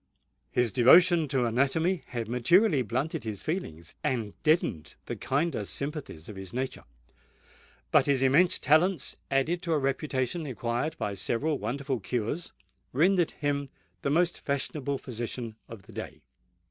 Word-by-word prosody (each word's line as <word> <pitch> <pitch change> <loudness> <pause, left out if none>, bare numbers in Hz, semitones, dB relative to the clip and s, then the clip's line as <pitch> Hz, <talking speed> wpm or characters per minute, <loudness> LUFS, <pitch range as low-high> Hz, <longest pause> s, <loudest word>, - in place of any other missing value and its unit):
His 125 -2 +1
devotion 165 +6 +6
to 130 -3 +1
anatomy 140 +9 +1
had 120 -3 -4
materially 145 - +4
blunted 130 +7 -2
his 110 -3 -5
feelings 85 - -4
and 120 -8 -1
deadened 155 - +1
the - - -4
kinder 145 -4 -1
sympathies 140 - -5
of 105 - -8
his 95 -1 -8
nature; 130 +1 -4 1.1
but - - +5
his 135 -2 +2
immense 150 +7 +4
talents, 160 +2 +2
added 145 +6 +1
to 170 -3 -1
a - - +3
reputation 135 +2 -1
acquired 125 +5 -2
by 100 - -2
several 120 +10 -1
wonderful 130 +4 -2
cures, 120 - -3 0.4
rendered 175 +5 +3
him 140 -1 -2 0.3
the - - -1
most 170 +4 +2
fashionable 140 0 -2
physician 120 -2 -5
of 115 -4 -10
the - - -15
day. - - -7
135 Hz, 140 wpm, -28 LUFS, 120-160 Hz, 1.1 s, devotion